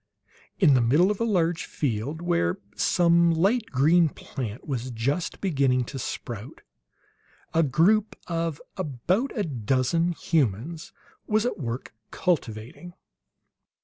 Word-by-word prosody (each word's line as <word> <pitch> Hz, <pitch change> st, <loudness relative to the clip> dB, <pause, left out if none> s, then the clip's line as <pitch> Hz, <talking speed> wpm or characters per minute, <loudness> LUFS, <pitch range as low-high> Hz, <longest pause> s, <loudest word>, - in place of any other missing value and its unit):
In 160 Hz, -8 st, +5 dB
the 125 Hz, -, +4 dB
middle 150 Hz, -, +4 dB
of 210 Hz, -, -3 dB
a -, -, +2 dB
large 175 Hz, -6 st, +1 dB
field, 140 Hz, +5 st, -3 dB
where 130 Hz, -, +1 dB, 0.2 s
some 170 Hz, -1 st, +4 dB
light 200 Hz, +8 st, +2 dB
green 160 Hz, +5 st, +4 dB
plant 120 Hz, -5 st, -7 dB
was 130 Hz, -3 st, -3 dB
just 130 Hz, +9 st, -2 dB
beginning 135 Hz, -8 st, +2 dB
to 135 Hz, +2 st, -7 dB
sprout, 120 Hz, -1 st, -6 dB, 0.9 s
a 165 Hz, -, +4 dB
group 170 Hz, -, +3 dB
of 165 Hz, -3 st, -2 dB, 0.2 s
about 185 Hz, -, -1 dB
a 210 Hz, -, +1 dB
dozen 135 Hz, -, 0 dB
humans 155 Hz, -, -1 dB, 0.4 s
was 215 Hz, +1 st, +2 dB
at 235 Hz, -5 st, -2 dB
work 120 Hz, -2 st, -5 dB, 0.2 s
cultivating. 160 Hz, -, -3 dB
160 Hz, 120 wpm, -26 LUFS, 125-175 Hz, 0.9 s, In